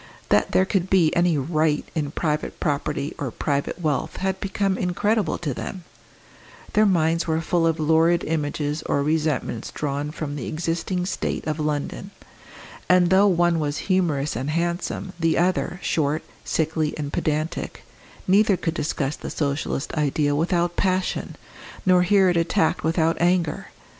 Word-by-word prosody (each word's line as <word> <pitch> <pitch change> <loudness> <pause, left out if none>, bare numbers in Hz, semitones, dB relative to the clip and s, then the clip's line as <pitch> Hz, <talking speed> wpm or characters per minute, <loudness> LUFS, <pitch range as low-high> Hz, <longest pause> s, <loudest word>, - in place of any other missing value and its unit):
That - - +3
there 185 - +4
could 190 -1 -1
be 175 -5 +3
any 170 -2 +3
"right" 155 +1 +1
in 150 -4 -1
private 150 0 -2
property 145 0 -1
or 140 - -2
private 140 +7 -2
wealth 155 -5 -1
had 190 0 -1
become 195 0 0
incredible 185 +1 0
to 150 -6 -3
them; 185 +8 -6 0.9
their 215 0 +5
minds 165 -3 +2
were 160 0 +1
full 165 0 +1
of 165 0 0
lurid 160 +2 +3
images 150 -1 -2
or 140 - +1
resentments 150 -6 -1
drawn 145 0 -3
from 150 -2 -5
the 135 - -5
existing 170 +3 -2
state 190 - -3
of 155 0 -2
London; 150 +5 -2 0.8
and 180 -1 +5
though 195 +2 +6
one 175 -3 +3
was 150 -1 -1
humorous 155 -8 +1
and 130 +5 -3
handsome, 175 +3 -2
the 165 -1 +2
other, 180 +1 0
short, 150 -1 0 0.2
sickly, 160 -1 -1
and 145 -1 -4
pedantic, 155 +1 -2 0.4
neither 200 +1 +4
could 165 - -2
discuss 145 -3 -2
the - - -7
Socialist 140 -1 -2
ideal 145 -1 +1
without 175 +2 +1
passion, 185 -1 -1 0.5
nor 185 -1 +5
hear 190 +1 +4
it 175 -1 +2
attacked 165 -1 +1
without 165 0 +1
anger. 175 -2 +1
160 Hz, 150 wpm, -23 LUFS, 150-180 Hz, 0.9 s, though